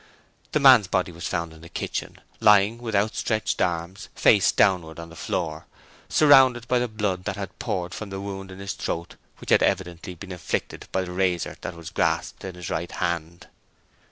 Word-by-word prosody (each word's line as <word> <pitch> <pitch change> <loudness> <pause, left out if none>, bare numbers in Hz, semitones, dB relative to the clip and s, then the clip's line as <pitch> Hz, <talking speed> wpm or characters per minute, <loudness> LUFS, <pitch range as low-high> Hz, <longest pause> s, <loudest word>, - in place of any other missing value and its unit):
The 150 - +3
man's 130 -8 +7
body 95 -1 0
was 85 +1 -6
found 85 -2 -3
in 80 - -15
the 85 - -12
kitchen, - - -4 0.2
lying 105 +2 +5
with 115 -3 -4
outstretched 110 +1 0
arms 85 +2 -2
face - - +5
downwards 85 -4 +2
on 85 0 -8
the 85 - -13
floor, 80 -2 -3 0.4
surrounded 130 -6 +6
by 125 0 +2
the 125 - 0
blood 105 -5 -2
that 100 - -2
had 100 -2 -7
poured 90 -1 -3
from 110 - -6
the 95 0 -5
wound 95 -1 -6
in 95 - -10
his 100 0 -4
throat 85 -3 -4 0.2
which - - -7
had - - +6
evidently 90 -1 -1
been 95 +3 -10
inflicted 90 - -4
by 95 - 0
the 90 - -7
razor 90 -2 0
that 90 - -5
was 85 -1 -9
grasped - - -1
in 95 -2 -6
his 90 -1 -7
right 85 +2 -3
hand. 85 -1 -3
95 Hz, 190 wpm, -25 LUFS, 85-105 Hz, 0.4 s, man's